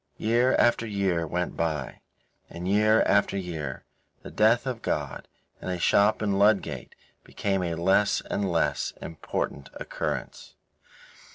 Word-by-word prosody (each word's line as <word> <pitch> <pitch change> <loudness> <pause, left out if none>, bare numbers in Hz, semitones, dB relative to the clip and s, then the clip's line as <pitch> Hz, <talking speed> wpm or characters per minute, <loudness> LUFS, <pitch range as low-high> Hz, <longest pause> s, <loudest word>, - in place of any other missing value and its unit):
Year 120 +4 +2
after 120 -1 +3
year 95 -5 0
went 90 +2 -2
by, 80 -5 -3 0.5
and 85 +2 -6
year 105 +3 +4
after 100 -1 +2
year 80 -7 -5 0.4
the - - -9
death 110 +4 +3
of 125 -3 -4
God 70 -4 -3 0.3
in - - -5
a 90 - -1
shop 100 +5 +3
in 100 -2 0
Ludgate 105 0 +1 0.3
became 95 -2 -2
a 85 -2 -2
less 95 +5 +2
and 100 -2 -2
less 85 - 0
important 75 -3 -4
occurrence. - - -5
95 Hz, 130 wpm, -26 LUFS, 85-105 Hz, 0.5 s, year